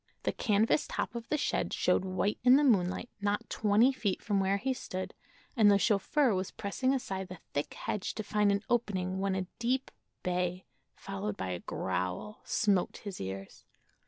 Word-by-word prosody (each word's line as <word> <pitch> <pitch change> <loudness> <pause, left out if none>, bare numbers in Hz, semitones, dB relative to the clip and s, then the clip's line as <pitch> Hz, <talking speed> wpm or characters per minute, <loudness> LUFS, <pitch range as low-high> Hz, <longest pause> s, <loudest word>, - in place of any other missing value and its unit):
The - - +1
canvas 220 +5 +2
top - - -2
of 235 -1 -6
the 300 - +2
shed 295 - 0
showed - - +2
white 190 +2 -1
in 250 +1 +8
the 290 - +5
moonlight, 200 -3 +2
not 205 0 -1
twenty 215 +5 +4
feet 205 -7 -1
from 205 -2 +1
where 195 +1 +2
he 260 +6 0
stood, 185 -6 -5 0.4
and 220 -5 +6
the 200 - +6
chauffeur 225 +6 +3
was 185 0 -1
pressing 255 +6 -1
aside 195 -9 -2
the 185 0 -8 0.2
thick 145 - -2
hedge 210 - -3
to 215 - -3
find 210 0 +2
an 200 +1 0
opening 190 -6 0
when 195 0 0
a 190 -1 -1
deep 255 +3 0 0.3
bay, 180 0 -1 0.3
followed 100 +1 -4
by 95 -1 -3
a 90 -1 -3
growl, 95 - -3
smote 200 -5 +1
his 200 - -6
ears. 95 0 -6
200 Hz, 180 wpm, -31 LUFS, 185-230 Hz, 0.4 s, in